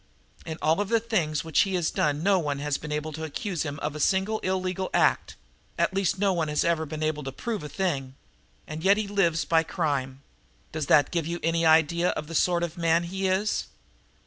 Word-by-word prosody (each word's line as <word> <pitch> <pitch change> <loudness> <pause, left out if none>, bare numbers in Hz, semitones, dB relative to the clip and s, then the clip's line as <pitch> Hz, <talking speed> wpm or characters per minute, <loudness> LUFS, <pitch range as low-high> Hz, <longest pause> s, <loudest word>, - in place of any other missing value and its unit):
In 160 -1 -4
all 160 +5 +3
of 205 - -3
the 230 - +3
things 170 -10 -1
which 160 -2 0
he 195 -1 +2
has 175 -3 0
done 150 +1 0
no 195 0 +4
one 145 -4 -2
has 145 0 -2
been 150 - -7
able 150 +1 -3
to 160 +1 -6
accuse 175 - -3
him 145 -2 -3
of 150 0 -2
a - - -5
single 195 +6 +1
illegal 185 0 -2
act - - +2 0.4
at - - +1
least 195 -1 0
no 195 0 +2
one 165 -3 0
has 150 0 0
ever 165 -2 0
been 155 +1 -5
able 155 -1 -1
to 135 -1 -5
prove 215 - -4
a 150 - -7
thing. 140 -9 -2 0.5
And 155 +1 -7
yet 200 +2 +5
he 215 -1 -2
lives 175 -5 +1
by 165 -1 +3
crime. 140 -5 -2 0.5
Does 155 -2 -3
that 145 - +4
give 165 -3 -1
you 170 +1 -3
an 165 +1 +1
idea 165 +1 +3
of 150 - -3
the 165 - -9
sort 175 +1 +2
of 175 +1 -4
man 165 0 +3
he 190 +3 -2
is?" 190 +3 0
165 Hz, 225 wpm, -26 LUFS, 150-190 Hz, 0.5 s, yet